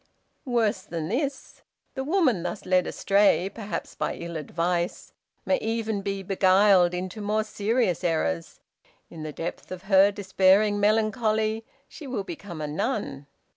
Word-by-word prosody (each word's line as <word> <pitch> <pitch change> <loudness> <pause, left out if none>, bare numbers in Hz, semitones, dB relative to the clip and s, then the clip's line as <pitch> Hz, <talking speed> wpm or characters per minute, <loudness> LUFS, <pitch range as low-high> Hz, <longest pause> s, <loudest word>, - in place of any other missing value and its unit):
"Worse 225 -6 +1
than 165 -3 -5
this, 275 +4 -3 0.3
the 265 - -3
woman 290 - +2
thus 180 +4 -5
led 185 -1 +2
astray, 195 -1 +2
perhaps 215 -2 -5
by - - -2
ill 170 0 -7
advice, 170 +3 -2 0.3
may 280 - +2
even 220 -2 -2
be 195 0 -3
beguiled 190 -1 +4
into 185 +4 -5
more 210 +1 0
serious 215 -3 0
errors. 85 - -1 0.5
In 165 - -9
the 155 0 -5
depth 165 +5 -6
of 185 0 -7
her 195 0 +5
despairing 200 +1 +3
melancholy 220 +1 +1 0.2
she 300 - -10
will 245 -6 -3
become 175 -2 -8
a 150 - -2
nun. 145 -1 -3
195 Hz, 140 wpm, -26 LUFS, 175-220 Hz, 0.5 s, her